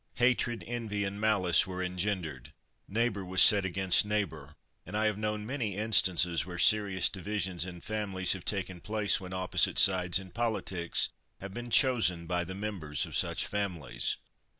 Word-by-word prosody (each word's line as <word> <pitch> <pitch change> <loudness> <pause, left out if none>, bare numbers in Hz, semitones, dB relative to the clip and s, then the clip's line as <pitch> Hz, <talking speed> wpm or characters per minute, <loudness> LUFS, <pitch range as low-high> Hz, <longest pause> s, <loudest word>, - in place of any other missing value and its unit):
Hatred, 120 -1 +1
envy, 110 -4 -3
and 100 +1 -4
malice 95 -5 +3
were 90 0 -4
engendered. 90 -7 -3 0.4
Neighbour 110 -2 -1
was 90 0 -3
set 100 0 +7
against 95 0 +2
neighbour, 90 -9 -3 0.3
and 100 +5 -5
I 110 - +1
have 105 -1 +1
known 105 0 -2
many 115 -5 -3
instances 95 -5 +2
where 90 -1 -8
serious 100 -2 +4
divisions 95 -2 -3
in 90 -2 -9
families 100 -4 0
have 95 -2 -8
taken 95 -3 -2
place 105 -1 +1
when 90 -1 -8
opposite 95 0 +1
sides 90 -2 +4
in 95 -1 -8
politics 105 -7 -1 0.3
have 100 0 -8
been 120 +2 -6
chosen 110 - +3
by 90 +1 -1
the 95 +2 -7
members 95 -8 -3
of - - -8
such - - +1
families. 90 -11 -3
95 Hz, 160 wpm, -30 LUFS, 90-105 Hz, 0.4 s, set